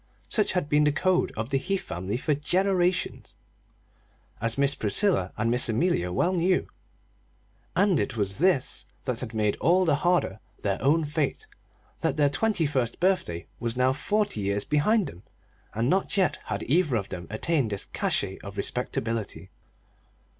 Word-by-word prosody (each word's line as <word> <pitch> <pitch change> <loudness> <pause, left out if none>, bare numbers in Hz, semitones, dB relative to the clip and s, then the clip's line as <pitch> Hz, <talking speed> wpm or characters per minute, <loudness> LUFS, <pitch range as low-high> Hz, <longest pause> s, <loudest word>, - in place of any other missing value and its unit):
Such 215 - +2
had 180 -6 0
been 150 0 +3
the 150 - +4
code 185 +4 +1
of 115 +4 -3
the 135 - +2
Heath 195 +6 -2
family 95 +6 -3
for 150 +4 0
generations, 180 +4 0 1.1
as 115 +2 0
Miss 140 0 +2
Priscilla 110 - +1
and 115 +2 +1
Miss 125 0 +3
Amelia 110 - +1
well 175 - +1
knew; 180 +1 +1 1.1
and 195 -6 +3
it 115 - -2
was 100 0 -1
this 175 -6 +1 0.2
that 125 -2 -2
had 115 -3 -6
made 105 -1 +1
all 185 +3 +3
the 150 -4 +3
harder 175 - +1 0.2
their 100 -1 -1
own 155 +4 +3
fate 150 - -2 0.5
that 160 -4 -1
their 145 -2 +3
twenty 205 0 +1
first 130 -5 -1
birthday 175 - 0
was 120 0 -2
now 130 +1 +3
forty 205 - -1
years 100 +1 0
behind 185 +8 +2
them, 90 - -9 0.5
and 115 +2 +1
not 190 +6 +1
yet 190 -2 +2
had - - -3
either 155 -2 +2
of 100 -3 -2
them 85 -3 -6
attained 130 +4 0
this 100 -2 -3
cachet 95 -1 -1
of 100 0 -10
respectability. 110 -2 -3
140 Hz, 160 wpm, -27 LUFS, 110-180 Hz, 1.1 s, the